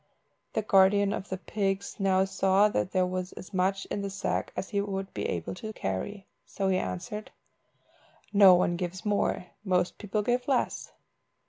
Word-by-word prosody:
The 220 Hz, -, 0 dB
guardian 200 Hz, 0 st, +4 dB
of 205 Hz, -2 st, -5 dB
the 190 Hz, -, -2 dB
pigs 195 Hz, 0 st, -2 dB
now 190 Hz, -1 st, +3 dB
saw 195 Hz, +1 st, +3 dB
that 195 Hz, -, -1 dB
there 185 Hz, -1 st, +2 dB
was 185 Hz, 0 st, -3 dB
as 185 Hz, -, -11 dB
much 190 Hz, +1 st, +1 dB
in 205 Hz, -, -1 dB
the 200 Hz, -, -3 dB
sack 195 Hz, 0 st, -2 dB
as 190 Hz, -, -4 dB
he 200 Hz, -1 st, 0 dB
would 195 Hz, -1 st, -4 dB
be -, -, -2 dB
able 85 Hz, -2 st, -3 dB
to 220 Hz, +4 st, -6 dB
carry, 190 Hz, -, -4 dB, 0.2 s
so 195 Hz, -1 st, -2 dB
he 185 Hz, -, +3 dB
answered 95 Hz, -, -5 dB, 1.0 s
"No 195 Hz, -3 st, +8 dB
one 175 Hz, -1 st, +1 dB
gives 185 Hz, +3 st, -5 dB
more, 205 Hz, -3 st, 0 dB, 0.2 s
most 180 Hz, -3 st, 0 dB
people 210 Hz, 0 st, -1 dB
give 245 Hz, +3 st, 0 dB
less." 265 Hz, -3 st, 0 dB
195 Hz, 170 wpm, -28 LUFS, 185-205 Hz, 1.0 s, No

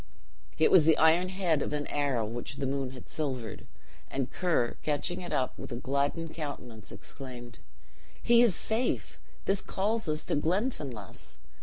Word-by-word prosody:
It 155 Hz, -, +5 dB
was 160 Hz, -4 st, +7 dB
the 160 Hz, -, +6 dB
iron 165 Hz, +3 st, +5 dB
head 180 Hz, -6 st, +1 dB
of -, -, -2 dB
an 145 Hz, 0 st, -1 dB
arrow 140 Hz, -6 st, 0 dB
which 120 Hz, +5 st, -4 dB
the 140 Hz, -, -2 dB
moon 135 Hz, -1 st, -1 dB
had 130 Hz, -1 st, -11 dB
silvered; 130 Hz, -8 st, -4 dB, 0.4 s
and 135 Hz, -1 st, -2 dB
Ker, 165 Hz, -10 st, +1 dB
catching 150 Hz, +4 st, -1 dB
it 175 Hz, -, -6 dB
up, 130 Hz, -, 0 dB
with -, -, -7 dB
a -, -, -2 dB
gladdened 140 Hz, +6 st, -1 dB
countenance 125 Hz, -9 st, -6 dB
exclaimed, 120 Hz, -, -9 dB, 0.6 s
"He 235 Hz, 0 st, +6 dB
is 230 Hz, -8 st, +5 dB
safe! 225 Hz, +3 st, -1 dB, 0.3 s
this 195 Hz, 0 st, +2 dB
calls 210 Hz, -1 st, -1 dB
us 155 Hz, +1 st, 0 dB
to -, -, 0 dB
Glenfinlass." 150 Hz, -, -2 dB
145 Hz, 160 wpm, -30 LUFS, 130-175 Hz, 0.6 s, was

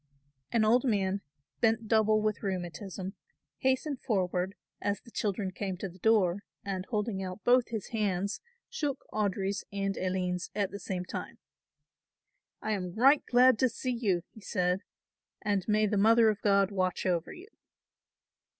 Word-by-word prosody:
An 225 Hz, -2 st, +3 dB
old 240 Hz, +3 st, +4 dB
man, 200 Hz, -5 st, +1 dB, 0.4 s
bent 225 Hz, 0 st, +2 dB
double 215 Hz, -1 st, +3 dB
with 215 Hz, -1 st, 0 dB
rheumatism, 190 Hz, 0 st, -4 dB, 0.5 s
hastened 265 Hz, +1 st, 0 dB
forward 190 Hz, -3 st, 0 dB, 0.3 s
as 205 Hz, -1 st, 0 dB
the 235 Hz, -, -17 dB
children 200 Hz, -3 st, -1 dB
came 190 Hz, 0 st, -4 dB
to 195 Hz, -, -4 dB
the 185 Hz, 0 st, -14 dB
door 200 Hz, -4 st, +3 dB, 0.3 s
and, 190 Hz, -1 st, -3 dB
holding 210 Hz, -3 st, -1 dB
out 185 Hz, +1 st, -6 dB
both 245 Hz, 0 st, +4 dB
his 220 Hz, -4 st, -5 dB
hands, 200 Hz, -3 st, -1 dB, 0.3 s
shook 295 Hz, -, -3 dB
Audry's 200 Hz, -1 st, -1 dB
and 195 Hz, -1 st, -1 dB
Aline's 180 Hz, -1 st, -1 dB
at 200 Hz, -2 st, 0 dB
the 200 Hz, -, -6 dB
same 180 Hz, -1 st, -4 dB
time. -, -, -6 dB, 1.3 s
"I 220 Hz, -, -1 dB
am 180 Hz, -4 st, -2 dB
right 270 Hz, +6 st, +5 dB
glad 250 Hz, -1 st, +5 dB
to 260 Hz, -, +4 dB
see 250 Hz, +2 st, -3 dB
you," 200 Hz, -8 st, 0 dB
he 220 Hz, -, -14 dB
said, 180 Hz, -2 st, 0 dB, 0.6 s
"and 200 Hz, -2 st, 0 dB
may 215 Hz, 0 st, +3 dB
the 210 Hz, 0 st, 0 dB
Mother 225 Hz, +2 st, +6 dB
of 210 Hz, -, -6 dB
God 200 Hz, -1 st, +3 dB
watch 185 Hz, -2 st, -1 dB
over 175 Hz, -3 st, 0 dB
you." 370 Hz, +4 st, -11 dB
200 Hz, 155 wpm, -30 LUFS, 190-225 Hz, 1.3 s, Mother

